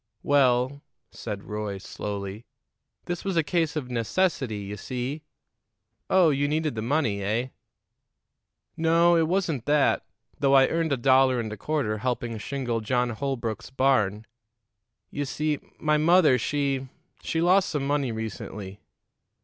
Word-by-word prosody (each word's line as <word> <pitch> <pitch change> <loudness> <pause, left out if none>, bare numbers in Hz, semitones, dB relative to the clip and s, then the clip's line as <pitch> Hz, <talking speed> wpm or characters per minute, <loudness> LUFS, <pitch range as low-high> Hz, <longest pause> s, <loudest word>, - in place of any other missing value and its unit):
"Well," 130 0 +2 0.3
said 105 -3 -6
Roy 105 -2 -4
slowly, 100 +2 -6 0.6
"this 175 -1 -4
was 195 -3 -2
a 165 - +4
case 165 -1 0
of 130 -5 -4
necessity, 130 - 0
you 100 0 -6
see." 130 +6 -4 0.9
"Oh, 180 -4 +5
you 145 0 +1
needed 155 0 0
the 110 - -4
money, 120 -5 0
eh?" 110 +6 -1 1.3
"No; 165 +1 +4
it 165 -1 +3
wasn't 170 - -1
that, 145 -1 +3 0.4
though 140 -1 +4
I 135 -1 +7
earned 165 -2 0
a 140 - +2
dollar 130 0 +4
and 110 -2 -3
a - - -8
quarter 120 -4 -1
helping 120 -1 -2
shingle 120 -1 -2
John 125 +2 0
Holbrook's 115 -3 -3
barn. 120 -6 +1 0.9
You 145 - -2
see 150 +1 -1 0.2
my 150 0 +2
mother, 155 -4 +5
she 135 0 -1 0.3
she 165 - -2
lost 185 +3 +4
some 145 -3 -2
money 140 -3 0
recently." 105 -3 -6
135 Hz, 140 wpm, -26 LUFS, 110-155 Hz, 1.3 s, I